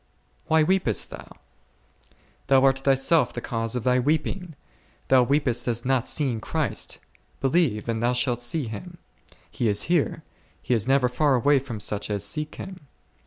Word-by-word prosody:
Why 160 Hz, 0 st, +4 dB
weepest 180 Hz, -, 0 dB
thou? -, -, -10 dB, 1.2 s
Thou 135 Hz, -1 st, +4 dB
art 135 Hz, -1 st, +4 dB
thyself 135 Hz, +4 st, +2 dB
the -, -, -4 dB
cause 115 Hz, -1 st, -2 dB
of 125 Hz, -, -2 dB
thy 125 Hz, 0 st, +3 dB
weeping; 160 Hz, +5 st, -1 dB, 0.5 s
thou 130 Hz, -1 st, +6 dB
weepest 125 Hz, -2 st, +1 dB
as 120 Hz, 0 st, -1 dB
not 130 Hz, -2 st, +1 dB
seeing 130 Hz, -7 st, +1 dB
Christ; -, -, -2 dB, 0.4 s
believe, 135 Hz, -7 st, +1 dB
and 115 Hz, -1 st, -2 dB
thou 120 Hz, +1 st, +2 dB
shalt 125 Hz, -1 st, 0 dB
see 130 Hz, +4 st, -1 dB
Him; 170 Hz, -, -8 dB, 0.5 s
He 120 Hz, -, -1 dB
is 105 Hz, 0 st, +2 dB
here, 160 Hz, -2 st, 0 dB, 0.4 s
He -, -, -2 dB
is 115 Hz, 0 st, 0 dB
never 135 Hz, -1 st, +3 dB
far 135 Hz, +3 st, +2 dB
away 140 Hz, +3 st, +3 dB
from 125 Hz, -5 st, -7 dB
such 105 Hz, 0 st, -2 dB
as 100 Hz, -1 st, -2 dB
seek 150 Hz, -1 st, -4 dB
Him. 185 Hz, -7 st, -9 dB
130 Hz, 165 wpm, -25 LUFS, 120-150 Hz, 1.2 s, thou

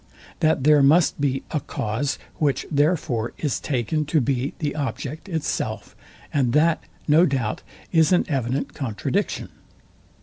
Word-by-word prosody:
that 155 Hz, -4 st, +2 dB
there 150 Hz, 0 st, +6 dB
must 150 Hz, +2 st, +4 dB
be 135 Hz, -2 st, 0 dB
a 155 Hz, -, 0 dB
cause; 135 Hz, +1 st, -2 dB, 0.2 s
which 145 Hz, -3 st, 0 dB
therefore 145 Hz, -6 st, +1 dB
is 145 Hz, -4 st, -1 dB
taken 140 Hz, +3 st, -1 dB
to 155 Hz, +2 st, +1 dB
be 135 Hz, +1 st, -1 dB
the 150 Hz, -3 st, -2 dB
object 150 Hz, +3 st, -4 dB
itself; 160 Hz, -4 st, -3 dB, 0.4 s
and 130 Hz, -5 st, +2 dB
that, 160 Hz, +2 st, +3 dB, 0.3 s
no 155 Hz, +3 st, +6 dB
doubt, 130 Hz, -10 st, 0 dB, 0.3 s
is 160 Hz, -2 st, +4 dB
an 180 Hz, -, +4 dB
evident 135 Hz, -2 st, -1 dB
contradiction. 115 Hz, -8 st, -2 dB
145 Hz, 135 wpm, -23 LUFS, 130-155 Hz, 0.4 s, there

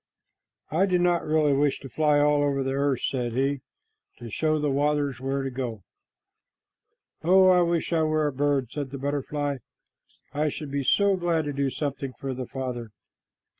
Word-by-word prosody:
"I 180 Hz, +6 st, +2 dB
do 180 Hz, -2 st, +2 dB
not 175 Hz, -1 st, +2 dB
really 155 Hz, -2 st, +2 dB
wish 140 Hz, 0 st, +1 dB
to 135 Hz, -, -8 dB
fly 150 Hz, 0 st, +2 dB
all 145 Hz, 0 st, +3 dB
over 140 Hz, -1 st, +1 dB
the 135 Hz, 0 st, -2 dB
earth," 140 Hz, -1 st, 0 dB
said 120 Hz, -3 st, -1 dB
he, 135 Hz, +2 st, 0 dB, 0.6 s
"to 115 Hz, -1 st, -9 dB
show 155 Hz, +4 st, +1 dB
the 150 Hz, -1 st, 0 dB
waters 145 Hz, -2 st, 0 dB
where 135 Hz, +1 st, -2 dB
to 135 Hz, -, -3 dB
go." 120 Hz, -6 st, -5 dB, 1.4 s
"Oh, 185 Hz, +3 st, +6 dB
I 180 Hz, -1 st, +5 dB
wish 170 Hz, 0 st, 0 dB
I 165 Hz, -, +3 dB
were 155 Hz, -1 st, +1 dB
a 145 Hz, -, -1 dB
bird," 140 Hz, -3 st, 0 dB
said 140 Hz, -2 st, -4 dB
a 140 Hz, -, -5 dB
butterfly. 145 Hz, +1 st, -2 dB, 0.8 s
"I 150 Hz, +1 st, +1 dB
should 145 Hz, 0 st, -6 dB
be 140 Hz, 0 st, -1 dB
so 200 Hz, +8 st, +3 dB
glad 170 Hz, -3 st, 0 dB
to 145 Hz, -, -3 dB
do 140 Hz, 0 st, 0 dB
something 140 Hz, -1 st, -4 dB
for 135 Hz, 0 st, -5 dB
the 130 Hz, 0 st, -5 dB
Father." 125 Hz, -4 st, -5 dB
145 Hz, 180 wpm, -26 LUFS, 135-155 Hz, 1.4 s, Oh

